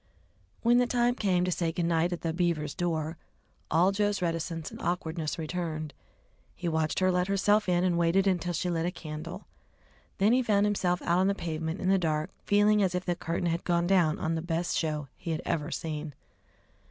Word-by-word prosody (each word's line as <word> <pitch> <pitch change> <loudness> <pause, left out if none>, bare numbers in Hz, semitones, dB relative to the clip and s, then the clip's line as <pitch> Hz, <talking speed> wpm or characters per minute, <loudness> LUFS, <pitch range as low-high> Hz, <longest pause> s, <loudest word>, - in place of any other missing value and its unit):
When 240 +1 +5
the 245 - +3
time 245 0 +2
came 185 -6 +1
to 180 - 0
say 170 -1 0
"Good 170 +1 -1
night" 170 +1 +1
at 175 - -4
the 165 -1 -1
Beavers' 165 -4 0
door, 165 -2 -2 0.5
all 175 +5 +4
Joe's 205 0 0
reticence 165 -2 -2
and - - -9
awkwardness 165 -3 -2
returned. 155 -2 -4 0.6
He 175 - -4
watched 160 -1 0
her 185 0 +3
let 180 0 +1
herself 205 +1 +2
in 175 0 +2
and 175 -2 +2
waited 170 +3 +3
until 180 -2 +1
she 175 - -1
lit 165 0 0
a - - -1
candle. 165 +3 -7 0.7
Then 205 +4 +4
he 255 - +4
found 210 -4 +2
himself 180 -4 0
out 175 +1 +2
on 190 - +3
the 200 - +1
pavement 160 0 -3
in 185 - 0
the 195 0 +4
dark 155 -3 -1
feeling 205 +1 +4
as 185 -2 +1
if 180 - -2
the 175 - 0
curtain 175 0 -3
had 165 +1 -1
gone 170 -1 +1
down 175 -4 +3
on 160 - -1
the 165 - -1
best 170 +1 -1
show 150 -3 -1 0.2
be 175 - -4
had 160 - -3
ever 150 -1 -1
seen. 155 -3 -4
175 Hz, 205 wpm, -29 LUFS, 160-190 Hz, 0.7 s, When